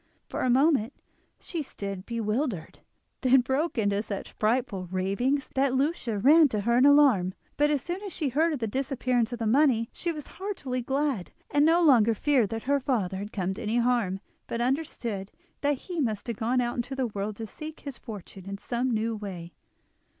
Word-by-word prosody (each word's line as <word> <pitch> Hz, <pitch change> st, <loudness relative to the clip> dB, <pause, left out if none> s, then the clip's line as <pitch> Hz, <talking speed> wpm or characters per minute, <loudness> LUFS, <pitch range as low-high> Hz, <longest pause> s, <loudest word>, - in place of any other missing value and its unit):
For -, -, -3 dB
a 255 Hz, -, +1 dB
moment 270 Hz, -2 st, +3 dB, 0.5 s
she 335 Hz, -, -4 dB
stood 200 Hz, -8 st, -6 dB
bewildered, 225 Hz, -, -2 dB, 0.4 s
then 260 Hz, 0 st, +5 dB
broke 270 Hz, +5 st, -1 dB
into 205 Hz, -2 st, +1 dB
such 205 Hz, -2 st, -6 dB
frightful 220 Hz, -4 st, 0 dB
ravings 200 Hz, +10 st, 0 dB
that 270 Hz, -1 st, +2 dB
Lucia 265 Hz, -5 st, 0 dB
ran 300 Hz, +9 st, +6 dB
to 215 Hz, -6 st, -2 dB
her 235 Hz, +3 st, +2 dB
in 270 Hz, -, +6 dB
alarm; 255 Hz, -11 st, +5 dB, 0.2 s
but 295 Hz, 0 st, +3 dB
as 290 Hz, -3 st, 0 dB
soon 350 Hz, +3 st, -4 dB
as 405 Hz, -2 st, -6 dB
she 305 Hz, -6 st, -1 dB
heard 315 Hz, +6 st, +2 dB
of 300 Hz, -, -1 dB
the 235 Hz, -, -2 dB
disappearance 250 Hz, -1 st, 0 dB
of 240 Hz, -, -3 dB
the 230 Hz, -, -3 dB
money 235 Hz, -1 st, +3 dB
she 345 Hz, -, -2 dB
was 300 Hz, -3 st, -7 dB
heartily 300 Hz, -11 st, -4 dB
glad, 270 Hz, -5 st, -1 dB, 0.2 s
and 290 Hz, -, +4 dB
no 340 Hz, +2 st, +4 dB
longer 230 Hz, -7 st, +5 dB
feared 255 Hz, -3 st, +2 dB
that 225 Hz, +1 st, -4 dB
her 280 Hz, +2 st, +2 dB
father 220 Hz, -9 st, -1 dB
had 205 Hz, +2 st, -6 dB
come 190 Hz, -1 st, -2 dB
to 190 Hz, -, -8 dB
any 225 Hz, +1 st, 0 dB
harm, 235 Hz, -6 st, +1 dB, 0.3 s
but 230 Hz, -, -3 dB
understood 240 Hz, -6 st, -2 dB, 0.3 s
that 285 Hz, -1 st, +1 dB
he 350 Hz, +4 st, -6 dB
must 215 Hz, -6 st, -1 dB
have 235 Hz, -3 st, -4 dB
gone 245 Hz, +3 st, +1 dB
out 240 Hz, 0 st, -1 dB
into 245 Hz, +3 st, -3 dB
the 265 Hz, -1 st, 0 dB
world 205 Hz, -2 st, -3 dB
to 225 Hz, -, -6 dB
seek 310 Hz, +7 st, -9 dB
his 280 Hz, -3 st, -7 dB
fortune 195 Hz, -4 st, -9 dB
in 200 Hz, -, -4 dB
some 245 Hz, +5 st, -2 dB
new 225 Hz, -1 st, 0 dB
way. 185 Hz, -5 st, -7 dB
245 Hz, 195 wpm, -27 LUFS, 210-280 Hz, 0.5 s, ran